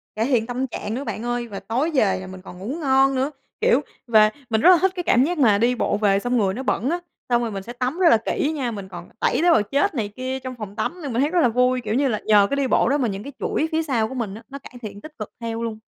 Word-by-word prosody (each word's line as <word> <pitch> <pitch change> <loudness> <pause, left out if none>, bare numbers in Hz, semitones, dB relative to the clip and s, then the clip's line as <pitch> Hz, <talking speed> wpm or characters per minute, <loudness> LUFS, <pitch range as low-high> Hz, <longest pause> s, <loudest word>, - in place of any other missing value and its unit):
Cải 220 +2 0
thiện 245 -4 +1
tâm 255 +2 -2
trạng 220 -3 -5
nữa 260 +4 -3
bạn 220 -4 -5
ơi, 240 0 -2
và 200 -3 -6
tối 235 +11 -1
về 215 -10 +2
là 185 - -8
mình 185 0 -10
còn 180 -1 -11
ngủ 195 - -7
ngon 270 -1 +3
nữa. 265 +3 0 0.3
Kiểu, 480 +2 +4 0.3
về 215 -2 +6 0.2
mình 220 -1 +1
rất 355 - +7
là 365 - +8
thích 380 0 +3
cái 355 - -3
cảm 250 -6 +4
giác 345 +5 -1
mà 225 -8 +4
đi 240 +4 +2
bộ 205 - 0
về 200 -2 +2
xong 245 +4 0
người 195 -4 +1
nó 255 +6 -5
bẩn 255 -1 0
á, 345 +2 0 0.3
xong 240 -1 +3
rồi 235 -2 -2
mình 195 -1 -5
sẽ 240 - -8
tắm 255 +7 -2
rất 355 -3 +6
là 230 - +6
kỹ 295 - 0
nha, 255 -5 -2
mình 200 -3 -7
còn 175 -1 -9
tẩy - - +1
tế 350 +1 +5
bào 325 - +5
chết 285 - 0
này 220 -5 -1
kia 260 +1 -3
trong 255 -1 -7
phòng 210 -4 -8
tắm 355 +10 -3
nên 280 -5 -4
mình 235 - +1
thấy 290 - +2
rất 360 - +2
là 250 - +4
vui. 250 +2 +2
Kiểu 215 -2 -3
như 275 +4 +2
là, 215 -5 -1
nhờ 205 -2 +5
cái - - 0
đi 275 -1 +1
bộ 245 - +3
đó 285 - +2
mà 260 -4 0
những 200 -1 -4
cái 280 - -8
chuỗi 315 - 0
phía 320 0 +1
sau 240 -8 0
của 265 - -8
mình 220 -6 -3
á, 225 - -11
nó 280 0 -8
cải - - -14
thiện 205 -3 -8
tích 310 +4 -12
cực 215 - -6
theo 230 -1 -4
luôn. 225 -2 -4
240 Hz, 315 wpm, -22 LUFS, 215-275 Hz, 0.3 s, là